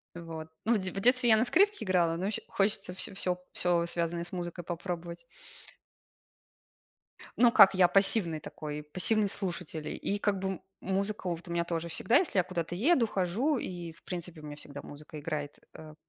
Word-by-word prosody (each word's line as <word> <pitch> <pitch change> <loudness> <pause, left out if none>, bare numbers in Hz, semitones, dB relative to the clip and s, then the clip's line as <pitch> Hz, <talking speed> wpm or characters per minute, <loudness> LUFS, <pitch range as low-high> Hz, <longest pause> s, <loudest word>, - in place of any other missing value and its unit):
Вот. 165 -2 -7 0.2
Ну, 235 - +4
в - - +4
де 185 -2 -3
в - - -4
детстве 250 +2 +4
я 220 - +7
на 225 - +3
скрипке 405 - +3
играла, 175 -3 +2
но 180 - -2
ещё 210 - -2
хочется 195 -2 0
всё 185 +2 -6
всё 180 -2 -2
всё, 175 -1 +1
связанное 170 0 -1
с 175 - -7
музыкой, 175 -1 -5
попробовать. 170 0 -5 2.1
Ну, 240 -1 +6
как, 195 - +8
я 185 -2 +5
пассивный 190 -3 +2
такой, 150 0 -6
пассивный 200 +7 +1
слушатель. 175 -6 -4
И 205 - 0
как 205 -1 +1
бы, 190 - -2
м, 190 - -4 0.2
музыка 195 +1 -1
вот 170 +1 -5
у - - -6
меня 170 0 +1
тоже 170 -1 -2
всегда, 230 +9 +2
если 330 - 0
я 185 - +5
куда-то 175 -1 -3
еду, 250 - +3
хожу, 215 - 0
и, 175 -6 -5
в - - -23
принципе, 175 -2 -6
у - - -10
меня 150 0 -7
всегда 145 -1 -8
музыка 150 +1 -10
играет, 145 0 -4 0.2
э. 155 -1 -11
180 Hz, 190 wpm, -30 LUFS, 165-200 Hz, 2.1 s, как